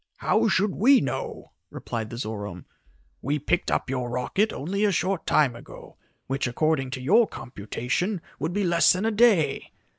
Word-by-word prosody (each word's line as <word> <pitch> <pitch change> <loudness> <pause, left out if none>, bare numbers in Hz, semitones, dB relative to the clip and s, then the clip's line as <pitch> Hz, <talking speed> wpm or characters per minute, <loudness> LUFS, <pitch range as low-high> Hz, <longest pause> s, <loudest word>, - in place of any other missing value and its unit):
"How 225 +1 +2
should 200 -2 +1
we 260 +6 +5
know?" - - -5 0.2
replied 110 -2 -5
the 120 - -7
Zorome. 105 -6 -6 0.6
"We 145 +4 -1
picked 175 +5 -1
up - - 0
your 125 -2 -3
rocket 160 - 0
only 195 +8 -3
a 210 - +3
short 185 -1 -1
time 140 -6 +3
ago, 120 - -13 0.3
which, 135 -1 -2
according 135 +1 0
to - - -8
your 210 - +4
computation, 125 - -3 0.2
would 155 +4 -2
be 205 +3 -1
less 170 -2 +4
than 185 +4 -2
a 225 - +2
day. 205 -10 +3
155 Hz, 170 wpm, -25 LUFS, 125-200 Hz, 0.6 s, we